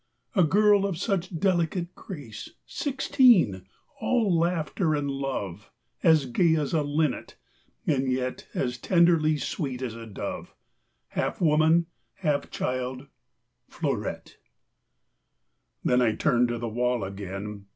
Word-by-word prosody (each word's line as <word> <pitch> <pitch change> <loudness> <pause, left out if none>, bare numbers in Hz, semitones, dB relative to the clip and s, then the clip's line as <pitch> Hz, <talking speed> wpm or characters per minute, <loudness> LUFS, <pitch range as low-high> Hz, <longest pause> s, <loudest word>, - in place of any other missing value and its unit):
A 185 - +4
girl 205 +4 +4
of 185 -5 -3
such 185 -2 -2
delicate 175 -1 0
grace; 145 - -9 0.2
Sixteen, 245 - +3 0.3
all 220 -8 +2
laughter 165 -1 +1
and 145 -1 -1
love; 120 -8 -4 0.3
As 160 -5 +5
gay 160 +6 +3
as 150 -1 -1
a 160 - +3
linnet, 145 -1 -1 0.5
and 135 -3 +1
yet 130 0 -3
As 125 -1 -1
tenderly 170 - +3
sweet 135 -4 -3
as 120 -3 -3
a 115 0 -9
dove; 105 - -6 0.5
Half - - -2
woman, 160 +1 +4 0.3
half 150 -4 -1
child 130 +1 -3 0.6
Fleurette. - - -4 1.5
Then 125 0 +3
I 110 -3 +2
turned 125 -5 +2
to 120 0 -2
the 120 0 -4
wall 120 0 0
again. 100 +1 -6
150 Hz, 120 wpm, -27 LUFS, 125-170 Hz, 1.5 s, As